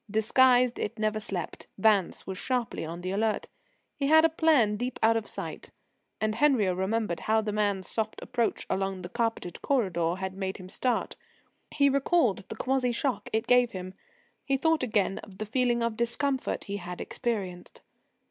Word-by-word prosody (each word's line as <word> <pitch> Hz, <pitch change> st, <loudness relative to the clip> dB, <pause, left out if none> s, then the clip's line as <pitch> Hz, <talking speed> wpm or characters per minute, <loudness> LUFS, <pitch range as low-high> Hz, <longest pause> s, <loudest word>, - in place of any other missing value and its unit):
Disguised, 245 Hz, +3 st, +4 dB
it 225 Hz, +2 st, -3 dB
never 215 Hz, 0 st, 0 dB
slept. 195 Hz, -6 st, -5 dB
Vance 200 Hz, -3 st, +2 dB
was 190 Hz, -, -5 dB
sharply 250 Hz, -3 st, -2 dB
on 165 Hz, +2 st, -6 dB
the 185 Hz, +1 st, -3 dB
alert. 215 Hz, +2 st, 0 dB, 0.5 s
He 280 Hz, -2 st, -1 dB
had 315 Hz, +2 st, +7 dB
a -, -, +5 dB
plan 305 Hz, -10 st, +3 dB
deep 245 Hz, +4 st, -3 dB
out 225 Hz, +1 st, +5 dB
of 225 Hz, -2 st, -2 dB
sight. -, -, -6 dB, 0.5 s
And 215 Hz, 0 st, 0 dB
Henriot 225 Hz, -7 st, +3 dB
remembered 190 Hz, -1 st, -1 dB
how 220 Hz, 0 st, +2 dB
the 215 Hz, -1 st, -3 dB
man's 205 Hz, -2 st, 0 dB
soft 220 Hz, -1 st, -2 dB
approach 240 Hz, -3 st, -1 dB
along 195 Hz, -1 st, -2 dB
the 175 Hz, -, -6 dB
carpeted 225 Hz, -6 st, -2 dB
corridor 180 Hz, -10 st, +1 dB
had 190 Hz, 0 st, -4 dB
made 190 Hz, 0 st, -4 dB
him 185 Hz, -1 st, -10 dB
start. 250 Hz, +5 st, -1 dB, 0.5 s
He 280 Hz, -1 st, +3 dB
recalled 275 Hz, -, +2 dB
the -, -, -5 dB
quasi 255 Hz, +1 st, 0 dB
shock 255 Hz, +2 st, -2 dB
it 220 Hz, +2 st, 0 dB
gave 245 Hz, 0 st, +4 dB
him. 185 Hz, 0 st, -6 dB, 0.5 s
He 275 Hz, -1 st, +1 dB
thought 320 Hz, +3 st, +2 dB
again 210 Hz, -6 st, 0 dB
of 195 Hz, -3 st, -12 dB
the 215 Hz, -, -4 dB
feeling 240 Hz, +1 st, +1 dB
of 230 Hz, -2 st, -1 dB
discomfort 260 Hz, +3 st, -1 dB
he 200 Hz, 0 st, -4 dB
had 180 Hz, -2 st, -7 dB
experienced. 200 Hz, -8 st, -4 dB
220 Hz, 175 wpm, -28 LUFS, 195-250 Hz, 0.5 s, had